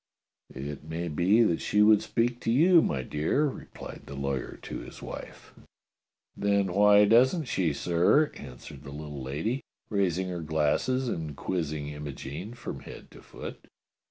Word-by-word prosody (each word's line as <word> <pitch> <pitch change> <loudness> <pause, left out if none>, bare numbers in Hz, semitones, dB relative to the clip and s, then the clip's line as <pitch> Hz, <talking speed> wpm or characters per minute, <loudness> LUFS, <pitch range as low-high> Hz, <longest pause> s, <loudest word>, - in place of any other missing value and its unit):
"It 70 +2 -6
may 80 +2 -4
be 95 +9 +4
that 85 -7 +1
she 105 0 +3
would 105 -1 +6
speak 120 +1 0
to 115 - -1
you, 165 +7 +6
my 65 - -1
dear," 75 - +1
replied 140 - -7
the 70 - -7
lawyer 70 -1 -3
to - - -5
his - - -10
wife. - - -9 0.8
"Then 100 -2 +1
why 105 +1 +6
doesn't 125 - +4
she, 90 -9 0
sir?" 90 - +3
answered 65 +2 -10
the 70 - -10
little 75 -1 -7
lady, 80 - -2 0.3
raising 95 -2 +1
her 90 -2 -4
glasses 80 - +1
and 80 - -3
quizzing 75 -5 -2
Imogene 75 - -7
from - - -6
head - - -11
to - - -14
foot. - - -9
85 Hz, 155 wpm, -28 LUFS, 75-110 Hz, 0.8 s, would